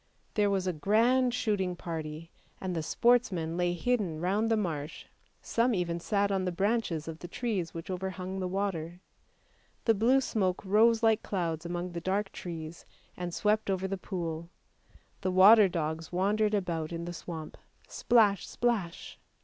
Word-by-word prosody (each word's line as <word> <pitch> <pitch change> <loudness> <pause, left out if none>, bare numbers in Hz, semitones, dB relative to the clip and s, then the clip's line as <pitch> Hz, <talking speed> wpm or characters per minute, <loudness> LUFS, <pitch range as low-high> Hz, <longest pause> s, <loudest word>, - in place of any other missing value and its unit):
There 205 -1 +2
was 195 -2 0
a 185 - 0
grand 235 +9 +3
shooting 205 -7 -1
party, 160 -1 -6 0.3
and 185 -2 -3
the 165 - -1
sportsmen 185 -4 +2
lay 175 0 +1
hidden 185 -4 -1
round 200 +6 +1
the 225 - +3
marsh, 155 -7 -4 0.4
some 235 0 +1
even 170 -2 -1
sat 200 +2 0
on 190 -1 0
the 180 - -1
branches 190 -4 -1
of 165 0 -6
the 175 - -7
trees 205 -6 -3
which 165 0 -6
overhung 190 0 -4
the 185 - -2
water; 180 -3 -3 0.9
the 225 - +5
blue 235 +6 +4
smoke 200 -8 -1
rose 225 +4 +4
like 225 -1 +4
clouds 170 -4 -2
among 175 +1 -3
the 170 0 -5
dark 195 +3 -1
trees 165 -2 -7 0.3
and 180 -1 -4
swept 210 +4 +1
over 190 0 0
the 195 - -2
pool. 170 -3 -5 0.7
The 190 - 0
water 195 +3 +7
dogs 160 -1 -3
wandered 210 +4 +1
about 170 -5 -2
in 170 0 -4
the 175 - -5
swamp, 165 -2 -7 0.3
splash! 215 -5 +3
splash! 220 -8 -2
185 Hz, 160 wpm, -30 LUFS, 170-210 Hz, 0.9 s, water